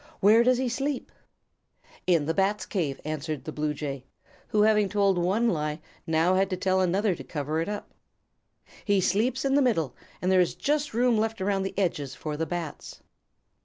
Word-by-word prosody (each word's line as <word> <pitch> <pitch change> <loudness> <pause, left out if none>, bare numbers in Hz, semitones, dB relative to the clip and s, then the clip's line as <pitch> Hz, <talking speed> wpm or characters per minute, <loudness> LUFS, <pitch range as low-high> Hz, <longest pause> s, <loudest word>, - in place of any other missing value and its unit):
"Where 220 +4 +6
does 250 0 +4
he 260 0 0
sleep?" 270 +3 -2 1.0
"In 170 -5 +3
the 165 - 0
Bats' 195 +1 +1
cave," 155 -9 -2
answered 155 -1 -4
the 155 - -6
Blue 150 0 -1
Jay, 140 -3 -5 0.4
who 210 -1 +2
having 210 -2 +3
told 200 -3 +2
one 195 +7 +2
lie, 150 -6 -1 0.3
now 165 +3 +3
had 190 +1 +2
to 185 - -2
tell 190 +1 +1
another 190 +3 +2
to - - -8
cover 155 +1 -2
it 165 - -3
up. 210 0 -6 0.9
"He 200 -2 +2
sleeps 235 +9 +1
in 270 - +2
the 285 - +4
middle 165 - +1 0.2
and 185 - 0
there 185 -1 +5
is 175 - 0
just 295 -4 -1
room 240 -2 +3
left 225 +1 -1
around 195 0 0
the 190 0 -4
edges 150 -8 -1
for 150 -1 -5
the 160 +2 -2
Bats." 170 -4 -6
190 Hz, 190 wpm, -27 LUFS, 160-220 Hz, 1.0 s, Where